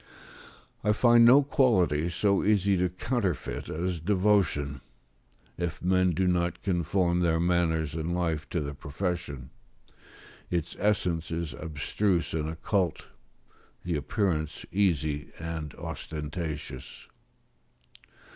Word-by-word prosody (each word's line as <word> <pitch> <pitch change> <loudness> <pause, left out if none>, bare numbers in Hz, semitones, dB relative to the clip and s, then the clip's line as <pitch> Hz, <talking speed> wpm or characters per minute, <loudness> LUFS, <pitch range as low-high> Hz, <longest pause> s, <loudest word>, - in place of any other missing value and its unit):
I 105 0 +3
find 120 +1 +6
no 135 +4 +8
quality 90 - +2
so 100 +3 +1
easy 100 -1 +3
to 90 0 +1
counterfeit 95 - -2
as 85 +1 -2
devotion, 90 -7 +1 0.8
if 85 -2 -3
men 90 0 +3
do 95 - +1
not 85 -1 0
conform 90 -1 +1
their 85 -2 +2
manners 85 -3 +1
and 80 +2 -2
life 80 -4 -1
to 85 - -1
the 70 0 -4
profession; 75 -3 -4 1.0
its 85 -1 -2
essence 90 -6 0
is 85 -4 -3
abstruse 80 +6 -1
and 80 -1 -1
occult; 85 +1 -1 0.7
the 85 -1 -1
appearance 80 0 -1
easy 80 -6 0
and 80 -3 -5
ostentatious. 75 -3 -6
85 Hz, 110 wpm, -28 LUFS, 80-95 Hz, 1.0 s, no